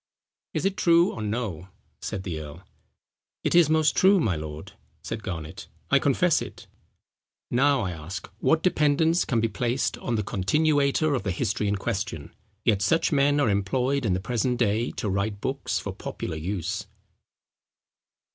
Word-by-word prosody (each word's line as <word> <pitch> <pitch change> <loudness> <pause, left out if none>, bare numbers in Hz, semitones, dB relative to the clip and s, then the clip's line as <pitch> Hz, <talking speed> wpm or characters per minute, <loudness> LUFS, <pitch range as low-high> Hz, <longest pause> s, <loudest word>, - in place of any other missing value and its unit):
Is - - -1
it 195 0 0
true 170 +1 +4
or 110 - -6
no?" 105 -5 -3 0.3
said 100 -4 -4
the 85 -5 -4
earl. 75 +4 -9 0.8
"It - - +1
is 170 -3 +6
most 155 -1 +3
true, 195 +1 +5
my 105 - +1
lord," 75 0 -7 0.3
said 115 -1 -4
Garnet, 80 -6 -6 0.2
"I - - +6
confess - - +2
it." - - -8 0.9
Now, 135 +2 +3
I 95 -4 -2
ask, 85 +3 -7
what 160 +7 +2
dependence 160 0 +3
can 115 - +1
be 115 - +2
placed 120 +3 -1
on 120 - -2
the 105 - 0
continuator 145 - +2
of 135 - 0
the 100 - -3
history 100 +3 -1
in 100 - +1
question? 90 -6 -4 0.3
Yet 105 -4 +3
such 165 +11 +2
men 145 0 +3
are 145 - +3
employed 125 +8 0
in 105 -5 +1
the - - -1
present 120 +4 -1
day 115 0 +1
to - - -3
write 100 +1 -1
books 135 +5 -2
for - - -4
popular 80 - -5
use. 95 +4 -3
110 Hz, 165 wpm, -26 LUFS, 95-145 Hz, 0.9 s, is